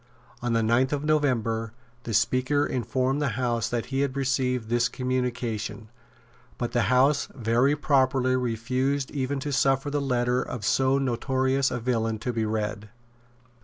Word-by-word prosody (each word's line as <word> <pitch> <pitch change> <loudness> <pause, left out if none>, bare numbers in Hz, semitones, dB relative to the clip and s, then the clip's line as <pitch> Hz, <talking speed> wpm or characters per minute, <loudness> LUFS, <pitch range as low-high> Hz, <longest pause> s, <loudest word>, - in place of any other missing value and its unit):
On 120 -1 -1
the 115 -1 +2
ninth 120 +4 +2
of 145 0 -2
November 115 -7 0 0.3
the 115 - -4
Speaker 130 +6 +2
informed 130 +2 -1
the 135 -6 -1
House 120 -3 0
that 120 -2 -2
he 135 - +1
had 140 -1 -1
received 125 -3 0
this 120 +1 +1
communication; 120 -4 -3 0.7
but 120 -1 -3
the 120 -4 +1
House 135 +3 +3
very 120 +3 +2
properly 130 -3 +2
refused 130 +3 -1
even 140 0 -2
to 145 +1 -3
suffer 135 +1 +2
the 145 0 0
letter 125 -2 +1
of 115 -5 -5
so 135 +3 +3
notorious 130 +1 +1
a 125 - -3
villain 115 -2 -1
to 120 +3 -3
be 115 -1 -1
read. 105 -1 -3
125 Hz, 155 wpm, -26 LUFS, 115-135 Hz, 0.7 s, House